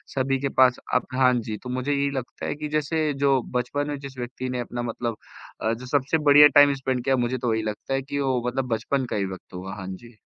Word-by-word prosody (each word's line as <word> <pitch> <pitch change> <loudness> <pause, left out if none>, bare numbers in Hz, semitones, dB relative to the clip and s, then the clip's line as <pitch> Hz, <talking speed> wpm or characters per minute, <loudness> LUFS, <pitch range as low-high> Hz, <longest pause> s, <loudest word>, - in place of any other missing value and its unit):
सभी 135 0 +1
के 140 - 0
पास 130 -1 +6 0.2
अब 125 - +1
हाँ 130 -1 +4
जी, 110 -1 -5
तो 125 - -6
मुझे 130 +3 -2
यही 140 0 +1
लगता 125 - -6
है - - -2
कि 150 0 -5
जैसे 155 0 0
जो 135 -1 +2 0.2
बचपन 145 +4 -2
में 145 - -3
जिस 135 -2 -9
व्यक्ति 125 +1 -5
ने 125 -1 -2
अपना 120 0 -4
मतलब 115 -1 -3 0.4
अ, 110 +1 +1
जो 125 +2 -7
सबसे 140 +4 +1
बढ़िया 145 +1 +10
टाइम 145 -1 +8
स्पेंड 130 -2 -2
किया 135 0 +2
है, 125 - 0
मुझे 125 +2 -1
तो 120 -2 0
यही 110 0 -1
लगता 110 +5 -4
है 135 - +1
कि 140 +1 -4
वो 130 -3 +1
मतलब 130 +1 -1
बचपन 130 +4 -1
का - - -2
ही 100 - 0
वक़्त 95 -1 -9
होगा। 95 +2 -6
हाँ 95 -2 -7
जी। 115 +5 -9
130 Hz, 255 wpm, -25 LUFS, 120-140 Hz, 0.4 s, बढ़िया